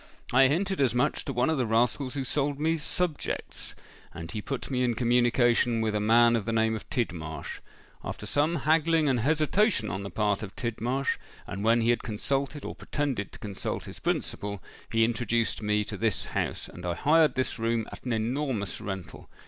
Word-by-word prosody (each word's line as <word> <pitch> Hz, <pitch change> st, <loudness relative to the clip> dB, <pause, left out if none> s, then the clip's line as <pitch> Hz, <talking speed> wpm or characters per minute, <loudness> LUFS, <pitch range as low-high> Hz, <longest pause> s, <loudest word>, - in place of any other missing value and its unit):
I 135 Hz, +1 st, +7 dB
hinted 185 Hz, +5 st, 0 dB
as 125 Hz, -3 st, +2 dB
much 125 Hz, -, +1 dB
to -, -, -2 dB
one 125 Hz, +4 st, +2 dB
of 155 Hz, -, 0 dB
the 125 Hz, -, +2 dB
rascals 120 Hz, +4 st, +1 dB
who 135 Hz, -, -1 dB
sold 145 Hz, +2 st, -1 dB
me 160 Hz, +2 st, +2 dB
subjects; 160 Hz, 0 st, -2 dB, 0.4 s
and 85 Hz, 0 st, -7 dB
he 105 Hz, -, -4 dB
put 135 Hz, +4 st, -5 dB
me 125 Hz, -1 st, +1 dB
in 120 Hz, -2 st, +1 dB
communication 120 Hz, 0 st, +3 dB
with 110 Hz, -1 st, 0 dB
a 105 Hz, -, +1 dB
man 115 Hz, +2 st, +5 dB
of 110 Hz, -4 st, -1 dB
the 115 Hz, -, -1 dB
name 110 Hz, 0 st, +2 dB
of 110 Hz, -, -8 dB
Tidmarsh. 80 Hz, -, -3 dB, 0.4 s
After -, -, -5 dB
some 150 Hz, +4 st, +1 dB
haggling 160 Hz, +1 st, +3 dB
and 130 Hz, -3 st, +2 dB
hesitation 155 Hz, -, +2 dB
on 95 Hz, +3 st, -3 dB
the 100 Hz, -, -5 dB
part 105 Hz, +1 st, 0 dB
of 105 Hz, -3 st, -7 dB
Tidmarsh—and 120 Hz, -3 st, -3 dB
when 115 Hz, +1 st, +4 dB
he 115 Hz, +1 st, +4 dB
had 120 Hz, -, 0 dB
consulted, 135 Hz, +6 st, -2 dB
or -, -, -4 dB
pretended 135 Hz, -9 st, -2 dB
to -, -, -9 dB
consult, 100 Hz, -2 st, -4 dB
his -, -, -8 dB
principal—he 105 Hz, +2 st, -2 dB
introduced 115 Hz, -1 st, 0 dB
me 105 Hz, 0 st, +1 dB
to -, -, -5 dB
this 110 Hz, -6 st, 0 dB
house, -, -, -2 dB
and 90 Hz, -, -11 dB
I 90 Hz, -1 st, -1 dB
hired 155 Hz, -, +4 dB
this 130 Hz, -2 st, -1 dB
room 115 Hz, 0 st, 0 dB
at -, -, -10 dB
an 125 Hz, -, -3 dB
enormous 115 Hz, -2 st, -1 dB
rental. 95 Hz, -3 st, -6 dB
120 Hz, 190 wpm, -28 LUFS, 110-140 Hz, 0.4 s, I